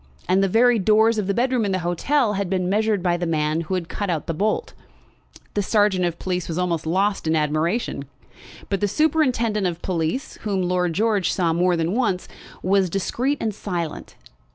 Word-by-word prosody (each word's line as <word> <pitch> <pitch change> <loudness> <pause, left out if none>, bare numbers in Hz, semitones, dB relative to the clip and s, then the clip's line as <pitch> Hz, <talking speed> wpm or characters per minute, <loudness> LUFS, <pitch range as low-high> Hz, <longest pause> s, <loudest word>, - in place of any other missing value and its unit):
And 185 +2 +3
the - - +3
very 230 +4 +4
doors 220 +3 +3
of 200 - -2
the 200 - +1
bedroom 250 -1 +1
in 200 -2 0
the - - +1
hotel 225 - +1
had 200 -2 -2
been 185 -1 0
measured 210 0 +1
by 175 -1 +2
the 175 0 -2
man 155 0 0
who 170 +3 -3
had 175 -2 -3
cut 200 +3 -4
out 165 -4 -1
the 165 - -2
bolt. 215 - -1 0.8
The 205 - +1
sergeant 205 -3 +2
of 170 -1 -2
police 180 -1 -3
was 165 - -4
almost 170 -3 -1
lost 195 +1 0
in 160 - +2
admiration; 155 +2 -1 0.6
but 195 0 -2
the 205 - +2
superintendent 245 -7 +1
of 175 -1 -5
police, 180 - -2
whom 200 -4 -1
Lord 180 -1 0
George 210 -1 +1
saw 170 -3 +1
more 175 +1 +2
than 165 +2 0
once, 210 -7 0 0.4
was 190 0 +2
discreet 245 - -1
and 220 -2 -1
silent. 175 -6 -5
190 Hz, 195 wpm, -22 LUFS, 175-215 Hz, 0.8 s, very